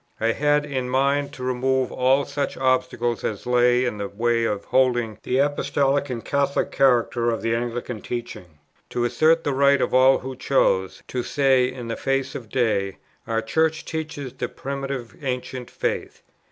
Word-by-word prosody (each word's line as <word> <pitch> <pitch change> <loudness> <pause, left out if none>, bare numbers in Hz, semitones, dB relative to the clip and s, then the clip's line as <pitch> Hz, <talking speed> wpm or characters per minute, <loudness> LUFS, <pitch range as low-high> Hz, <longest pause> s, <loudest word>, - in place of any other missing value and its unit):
I 115 +1 +2
had 145 +3 +2
in 130 -3 -3
mind 140 +2 +1
to 130 - -8
remove 130 +1 0
all 130 +2 +2
such 140 -1 -3
obstacles 125 -2 0
as 105 - -3
lay 125 0 +3
in 105 -4 -3
the 100 - -2
way 115 +2 +1
of 105 -3 -2
holding 120 -4 +1
the 125 - -1
Apostolic 140 0 +1
and 115 -3 -5
Catholic 140 0 0
character 120 -3 +2
of 115 -1 -2
the 115 0 +1
Anglican 120 -1 -3
teaching; 95 -10 -6 0.3
to 120 - -1
assert 160 +6 +3
the 145 - 0
right 140 +1 +4
of - - -1
all 130 +1 +6
who 130 0 -7
chose, 95 -8 +1
to 125 - -2
say 130 -1 +2
in 125 -2 -7
the 115 - -3
face 135 0 -1
of 115 -5 -8
day, 105 -6 0 0.3
"Our 115 -1 0
Church 160 +6 0
teaches 155 -5 -5
the - - -4
Primitive 135 -3 -5
Ancient 125 -1 -4
faith." - - -3
130 Hz, 170 wpm, -23 LUFS, 120-140 Hz, 0.3 s, all